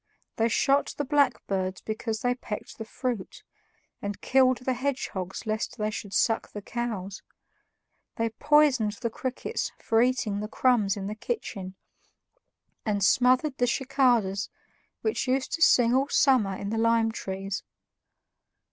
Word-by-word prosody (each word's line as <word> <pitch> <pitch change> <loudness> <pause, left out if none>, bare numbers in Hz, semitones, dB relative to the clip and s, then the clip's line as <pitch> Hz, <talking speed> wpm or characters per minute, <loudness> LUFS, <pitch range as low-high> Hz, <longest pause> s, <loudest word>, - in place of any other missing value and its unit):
They 230 0 +2
shot 275 +5 +2
the 290 - -1
blackbirds 215 -10 0
because 220 0 -3
they 245 0 +2
pecked 230 -4 -7
the 220 - -5
fruit, 235 -3 -4 0.6
and 200 0 -4
killed 255 -1 +3
the 260 - +1
hedgehogs 240 -8 -3
lest 220 +2 -2
they 215 -1 -1
should 205 -2 -6
suck 225 +2 +1
the 205 - -6
cows; 210 -6 -4 0.9
they 230 0 0
poisoned 280 -4 +3
the 230 +1 -4
crickets 255 +3 -3
for 225 0 +2
eating 245 -5 +1
the 210 - -3
crumbs 215 -4 +2
in 195 - -4
the 205 - -3
kitchen, 200 - -5 1.1
and 205 -2 0
smothered 255 +5 +3
the 245 - +3
cicadas 240 -7 +1 0.5
which 435 -10 -1
used 260 +1 0
to 330 - -3
sing 245 -6 +5
all 270 +2 +2
summer 240 -9 +3
in 200 - -5
the 225 - -1
lime 230 0 +3
trees. 195 -2 -4
230 Hz, 140 wpm, -27 LUFS, 205-255 Hz, 1.1 s, sing